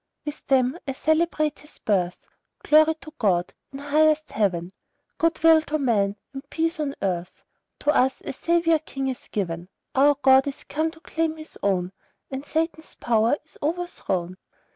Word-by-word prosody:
With 295 Hz, 0 st, -7 dB
them 260 Hz, +3 st, +2 dB
I 270 Hz, -, -1 dB
celebrate 310 Hz, 0 st, +1 dB
His 300 Hz, -, -14 dB
birth 180 Hz, -4 st, -1 dB, 0.4 s
Glory 310 Hz, +1 st, +5 dB
to 310 Hz, -, -11 dB
God, 180 Hz, -5 st, +1 dB, 0.2 s
in 270 Hz, -, -7 dB
highest 305 Hz, +2 st, +2 dB
Heaven, 185 Hz, -4 st, 0 dB, 0.5 s
Good 330 Hz, -1 st, +1 dB
will 325 Hz, -1 st, +7 dB
to 310 Hz, 0 st, -2 dB
men, 210 Hz, -8 st, +1 dB, 0.2 s
and 270 Hz, 0 st, -9 dB
peace 330 Hz, +1 st, -1 dB
on 285 Hz, -2 st, -2 dB
earth, 180 Hz, -2 st, -3 dB, 0.4 s
To 295 Hz, -, +3 dB
us 265 Hz, -2 st, +2 dB
a -, -, -4 dB
Saviour 330 Hz, +2 st, +2 dB
king 270 Hz, -3 st, -4 dB
is 255 Hz, -, -6 dB
given; 175 Hz, -4 st, -3 dB, 0.2 s
Our 285 Hz, +2 st, +5 dB
God 265 Hz, 0 st, +5 dB
is 280 Hz, -, -5 dB
come 315 Hz, +2 st, -1 dB
to 325 Hz, 0 st, -15 dB
claim 320 Hz, -1 st, -2 dB
His 310 Hz, 0 st, -10 dB
own, 185 Hz, -2 st, 0 dB, 0.4 s
And 265 Hz, +1 st, -4 dB
Satan's 320 Hz, +1 st, -3 dB
power 230 Hz, +3 st, +2 dB
is 315 Hz, -, -17 dB
overthrown! 290 Hz, -, -2 dB
280 Hz, 165 wpm, -24 LUFS, 215-315 Hz, 0.5 s, will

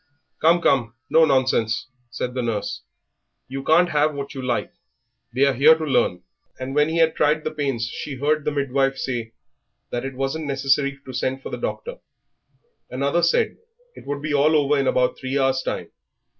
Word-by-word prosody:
"Come, 170 Hz, +2 st, +4 dB
come, 120 Hz, -4 st, +2 dB, 0.2 s
no 160 Hz, 0 st, +6 dB
nonsense!" 130 Hz, -5 st, +1 dB, 0.2 s
said 125 Hz, +1 st, -4 dB
the 125 Hz, -, -2 dB
nurse; 110 Hz, -4 st, -3 dB, 0.7 s
"you 135 Hz, +2 st, -5 dB
can't 170 Hz, +4 st, +4 dB
have 150 Hz, -1 st, +1 dB
what 140 Hz, 0 st, -5 dB
you 135 Hz, -, -6 dB
like; 125 Hz, +6 st, -2 dB, 0.6 s
they 130 Hz, +3 st, +3 dB
are 140 Hz, -, +3 dB
here 145 Hz, +5 st, +6 dB
to 160 Hz, -, -5 dB
learn;" 90 Hz, -10 st, +1 dB, 0.4 s
and 130 Hz, +1 st, -5 dB
when 150 Hz, +2 st, +3 dB
he 165 Hz, -, -1 dB
had 165 Hz, -1 st, +3 dB
tried 155 Hz, +1 st, +2 dB
the -, -, -2 dB
pains 135 Hz, -7 st, -2 dB
she 140 Hz, +4 st, -6 dB
heard 150 Hz, +3 st, 0 dB
the 150 Hz, -, 0 dB
midwife 135 Hz, -1 st, 0 dB
say 120 Hz, -4 st, -4 dB, 0.6 s
that 120 Hz, -, -2 dB
it 135 Hz, -1 st, -5 dB
wasn't 135 Hz, +4 st, -2 dB
necessary 140 Hz, 0 st, +1 dB
to 130 Hz, -, -8 dB
send 130 Hz, +1 st, -2 dB
for -, -, -7 dB
the -, -, -3 dB
doctor. -, -, -4 dB, 0.9 s
Another 140 Hz, +6 st, 0 dB
said 170 Hz, 0 st, +2 dB
that 470 Hz, +1 st, -20 dB
it -, -, -18 dB
would 145 Hz, 0 st, -4 dB
be 155 Hz, -1 st, -2 dB
all 150 Hz, +2 st, +4 dB
over 145 Hz, -1 st, +3 dB
in 135 Hz, -, +1 dB
about 125 Hz, -1 st, +1 dB
three 135 Hz, +1 st, -2 dB
hours' 135 Hz, -1 st, +2 dB
time. -, -, -4 dB
140 Hz, 190 wpm, -23 LUFS, 130-155 Hz, 0.9 s, no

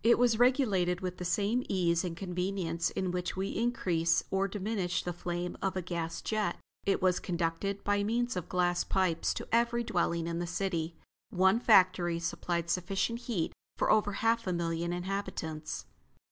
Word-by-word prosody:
It 235 Hz, +2 st, +6 dB
was 235 Hz, -2 st, +3 dB
regulated 205 Hz, -9 st, +3 dB
with 180 Hz, -1 st, -3 dB
the 180 Hz, -, -5 dB
same 205 Hz, +7 st, +1 dB
ease 170 Hz, -2 st, +2 dB
and 170 Hz, -2 st, -4 dB
convenience 180 Hz, -2 st, -2 dB
with 190 Hz, -, 0 dB
which 180 Hz, 0 st, -2 dB
we 195 Hz, +1 st, -1 dB
increase 170 Hz, -9 st, +1 dB
or 195 Hz, 0 st, +2 dB
diminish 195 Hz, -2 st, -2 dB
the 175 Hz, -, -3 dB
flames 175 Hz, 0 st, -4 dB
of 195 Hz, -1 st, -1 dB
a 185 Hz, -, -2 dB
gas 170 Hz, -1 st, -4 dB
jet. 215 Hz, -1 st, 0 dB, 0.3 s
It 195 Hz, -, +2 dB
was 185 Hz, -1 st, +3 dB
conducted, 175 Hz, +3 st, -2 dB
by 205 Hz, 0 st, +1 dB
means 240 Hz, +2 st, 0 dB
of 180 Hz, -, -4 dB
glass 175 Hz, -1 st, +1 dB
pipes, 185 Hz, -4 st, +1 dB
to -, -, -5 dB
every 235 Hz, +1 st, +2 dB
dwelling 170 Hz, -5 st, 0 dB
in 170 Hz, 0 st, -2 dB
the 175 Hz, -, -2 dB
city. 170 Hz, -3 st, -2 dB, 0.3 s
One 190 Hz, +4 st, +4 dB
factory 185 Hz, -6 st, +4 dB
supplied 170 Hz, 0 st, -2 dB
sufficient 195 Hz, +6 st, 0 dB
heat 225 Hz, -9 st, -2 dB, 0.2 s
for -, -, +2 dB
over 210 Hz, -1 st, +3 dB
half 230 Hz, +1 st, +1 dB
a 185 Hz, -, +1 dB
million 170 Hz, 0 st, -1 dB
inhabitants. 175 Hz, -4 st, -4 dB
185 Hz, 170 wpm, -31 LUFS, 170-205 Hz, 0.3 s, It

